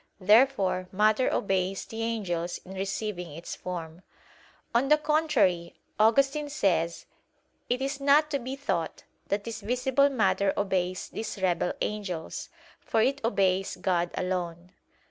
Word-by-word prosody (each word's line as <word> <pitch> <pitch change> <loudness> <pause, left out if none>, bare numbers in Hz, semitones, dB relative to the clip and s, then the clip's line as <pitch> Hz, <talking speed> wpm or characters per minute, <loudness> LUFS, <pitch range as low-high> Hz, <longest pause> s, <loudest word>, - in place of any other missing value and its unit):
Therefore 200 -3 +4
matter 215 +5 +3
obeys 190 -1 0
the 225 0 -6
angels 180 -7 -2
in 190 - -9
receiving 195 -2 -3
its 165 +3 -7
form. 170 -2 -6 0.7
On 240 +3 +3
the 300 +2 +6
contrary, 285 - +1 0.2
Augustine 275 +7 +3
says 170 - 0 0.6
"It 250 +2 0
is 275 +1 -2
not 295 +2 +4
to 280 - 0
be 260 +2 -5
thought, 280 +1 -3 0.2
that 200 +1 -1
this 230 0 -6
visible 260 +4 +2
matter 205 -6 +1
obeys 185 -2 -1
these 220 -2 -5
rebel 180 -2 +1
angels; 195 -6 -4 0.3
for 220 - +1
it 275 +3 +1
obeys 195 -4 +1
God 175 -2 0
alone." 180 -1 -3
205 Hz, 130 wpm, -28 LUFS, 180-255 Hz, 0.7 s, the